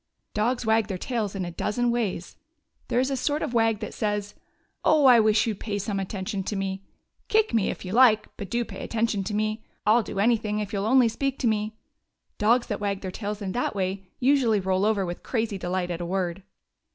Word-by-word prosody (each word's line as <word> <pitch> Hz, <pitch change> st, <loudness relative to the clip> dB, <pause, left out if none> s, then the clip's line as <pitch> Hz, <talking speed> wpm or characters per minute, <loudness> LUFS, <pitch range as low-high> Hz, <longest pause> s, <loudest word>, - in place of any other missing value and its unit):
Dogs 235 Hz, +3 st, 0 dB
wag 220 Hz, -1 st, +3 dB
their 190 Hz, -, -3 dB
tails 215 Hz, -1 st, -2 dB
in 190 Hz, -2 st, -2 dB
a 175 Hz, -, -5 dB
dozen 235 Hz, +7 st, 0 dB
ways. 210 Hz, -7 st, -2 dB, 0.5 s
There 245 Hz, -, +1 dB
is 260 Hz, +2 st, +1 dB
a -, -, +1 dB
sort 290 Hz, +4 st, -1 dB
of -, -, -3 dB
wag 225 Hz, -2 st, +2 dB
that -, -, -5 dB
says: 210 Hz, -1 st, -2 dB, 0.5 s
"Oh, 305 Hz, -2 st, +4 dB
I 250 Hz, -3 st, +8 dB
wish 215 Hz, -1 st, +4 dB
you 225 Hz, -, 0 dB
'd 195 Hz, -, -13 dB
pay 205 Hz, -2 st, -3 dB
some 200 Hz, 0 st, -2 dB
attention 195 Hz, +1 st, -3 dB
to 210 Hz, -, -2 dB
me. 195 Hz, 0 st, -3 dB, 0.4 s
Kick 435 Hz, 0 st, +2 dB
me, 220 Hz, -4 st, +2 dB
if -, -, -5 dB
you 185 Hz, -, -5 dB
like, 220 Hz, -2 st, +5 dB
but 200 Hz, -, -7 dB
do 235 Hz, +2 st, 0 dB
pay -, -, -8 dB
attention 225 Hz, -3 st, 0 dB
to 210 Hz, -, -3 dB
me. 215 Hz, +1 st, -1 dB, 0.2 s
I 210 Hz, -, +5 dB
'll 240 Hz, -, +4 dB
do 200 Hz, -, -7 dB
anything 215 Hz, 0 st, +2 dB
if 210 Hz, -1 st, -3 dB
you 200 Hz, -, 0 dB
'll 200 Hz, -, -1 dB
only 255 Hz, 0 st, +5 dB
speak 270 Hz, +4 st, -2 dB
to 250 Hz, -, 0 dB
me! 215 Hz, 0 st, 0 dB, 0.3 s
" -, -, -51 dB
Dogs 235 Hz, +4 st, +3 dB
that 210 Hz, -, -3 dB
wag 200 Hz, -1 st, -1 dB
their 185 Hz, -, -4 dB
tails 205 Hz, +1 st, -5 dB
in 190 Hz, -, -3 dB
that 245 Hz, 0 st, -1 dB
way 190 Hz, 0 st, -2 dB
usually 250 Hz, -5 st, +3 dB
roll 190 Hz, +1 st, +1 dB
over 210 Hz, -3 st, +2 dB
with 175 Hz, 0 st, -5 dB
crazy 225 Hz, -5 st, -2 dB
delight 180 Hz, 0 st, -2 dB
at 170 Hz, 0 st, -4 dB
a -, -, -3 dB
word. 185 Hz, 0 st, -2 dB
210 Hz, 235 wpm, -26 LUFS, 195-235 Hz, 0.5 s, I